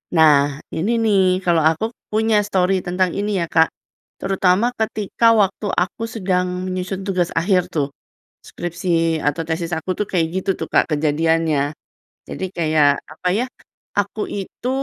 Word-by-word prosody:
Nah, 145 -3 +5 0.2
ini 195 +9 0
nih, 205 -3 +4 0.3
kalo 170 -2 +3
aku 165 +7 -1 0.2
punya 215 0 +2
stori 190 -2 +1
tentang 180 0 0
ini 205 0 -1
ya 170 - 0
Kak. 160 0 +3 0.5
Terutama 195 +4 +1
ketika 220 0 +1
waktu 200 0 +1
aku 190 +5 -1
sedang 185 -4 0 0.2
menyusun 185 +1 -4
tugas 180 -3 0
akhir 180 +1 +2
tuh. 145 -4 -2 0.5
Skripsi 165 -2 -1
atau 165 +3 0
tesis 165 +1 -2
aku 175 - -7
tuh 210 - +1
kayak 165 -3 +2
gitu 190 +1 -2
tuh - - -3
Kak - - +5
kejadiannya. 155 0 +1 0.7
Jadi - - -5
kayak 155 -3 +3
apa 170 +4 -5
ya, 240 +4 +1 0.5
aku 205 +2 -2
itu, 200 +5 -5
180 Hz, 145 wpm, -20 LUFS, 160-200 Hz, 0.7 s, Nah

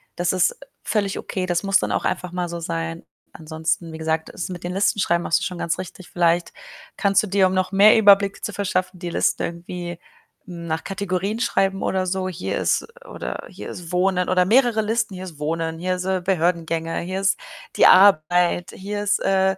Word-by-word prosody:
das 175 0 0
ist 185 -1 +2 0.3
völlig 200 -3 -1
okay. 185 -1 -4
Das 175 0 0
muss 195 0 +3
dann - - -2
auch - - -1
einfach 180 -1 -2
mal 180 -1 -3
so 170 0 -5
sein. 80 - -4 0.3
Ansonsten, 160 +1 -3
wie 160 - -8
gesagt, 160 0 -1
es 180 - -6
mit 180 -2 -7
den 175 - -4
Listen 195 +2 +1
schreiben, 170 -2 +1
machst - - +2
du - - -5
schon 180 -2 -4
ganz 170 - -1
richtig. 185 0 -9
Vielleicht 175 0 +1 0.5
kannst 200 -1 +3
du 215 - -5
dir, 195 0 +3
um 185 - -2
noch 185 0 0
mehr 200 +2 +7
Überblick 200 -2 +4
zu 210 - -3
verschaffen, 185 -2 -2
die 175 -1 -5
Liste - - +1
irgendwie 175 0 -6 0.5
nach 170 -2 -4
Kategorien 195 +2 -2
schreiben, 195 -5 0
oder 185 -1 0
so. 185 0 -1
Hier 100 - -3
ist 90 - 0 0.2
oder - - -6
hier 105 - -9
ist 175 -2 -8
Wohnen 180 0 +1
oder 185 0 +3
mehrere 235 +1 +3
Listen. 220 -1 -1
Hier 185 0 -7
ist 170 -5 -10
Wohnen, 160 +2 -2
hier 185 +1 -1
sind 185 0 -1
Behördengänge, 165 -2 0
hier 185 +2 -4
ist 195 - +2 0.4
die - - +5
Arbeit, 175 -2 +5
hier 205 +2 -5
ist 205 0 +1
äh 190 0 +2
180 Hz, 200 wpm, -22 LUFS, 170-195 Hz, 0.5 s, mehr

